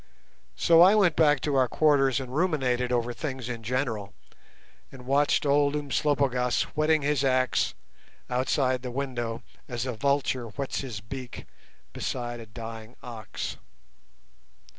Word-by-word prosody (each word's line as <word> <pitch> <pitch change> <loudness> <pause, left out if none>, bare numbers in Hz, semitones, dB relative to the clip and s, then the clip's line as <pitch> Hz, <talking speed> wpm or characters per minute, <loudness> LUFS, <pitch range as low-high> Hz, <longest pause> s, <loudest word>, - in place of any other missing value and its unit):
So 165 0 +5
I 190 +4 +8
went 185 -7 +4
back 150 -4 +4
to 150 - -1
our 130 -2 +3
quarters 135 -2 +3
and 130 -1 -6
ruminated 130 -8 +1
over 120 0 0
things 130 -3 -5
in 120 -2 -5
general, 115 -4 -2 0.8
and 125 -2 -12
watched 140 +3 +2
old 145 0 +3
Umslopogaas 140 -3 +1
whetting 155 0 +2
his 145 -1 +1
axe 130 -2 +1 0.5
outside 130 0 +1
the 125 - -5
window 120 -3 -3 0.2
as 120 0 -3
a 130 - -2
vulture 135 0 0
whets 135 +5 -4
his 120 -7 -6
beak 125 +3 -8 0.5
beside 120 -1 -4
a 115 - -10
dying 115 +1 -9
ox. 115 -3 -6
130 Hz, 135 wpm, -27 LUFS, 120-145 Hz, 0.8 s, I